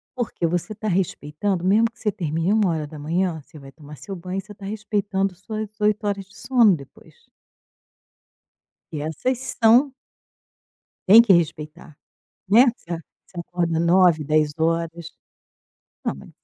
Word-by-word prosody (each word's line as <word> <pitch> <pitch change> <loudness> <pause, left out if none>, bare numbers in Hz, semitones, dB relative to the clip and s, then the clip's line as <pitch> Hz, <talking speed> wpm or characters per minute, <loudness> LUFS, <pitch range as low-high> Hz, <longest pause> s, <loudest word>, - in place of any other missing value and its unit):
porque 235 -8 -2
você 175 +4 -2
tá 215 +1 -6
respeitando 180 0 -2
mesmo 205 +5 +4
que - - -25
você 210 - 0
termine 165 0 -2
01:00, 165 -2 -1
você 155 +2 -15
vai 135 -1 -13
tomar 150 -1 -13
seu 195 +5 -8
banho 185 +2 -5
e - - -4
você 200 +2 -15
está 200 - -12
respeitando 200 -2 -2
suas 215 +3 -6
8 210 0 +1
horas 200 -1 -2
de 195 +2 -22
sono 230 -4 +3
depois. 140 -3 -15 1.8
Porque 150 -3 -5
essas 250 - -3
são 245 +5 +5 1.1
tem 220 +5 +9
que 220 - +4
respeitar, 155 -2 -2 0.5
né? 230 +7 +6
Você 170 0 -6 0.3
você 180 - -12
acorda 170 -2 -1
09:00, 170 -2 +4
10:00, 160 +2 -1 0.9
não - - -2
mas - - -13
180 Hz, 140 wpm, -22 LUFS, 160-210 Hz, 1.8 s, tem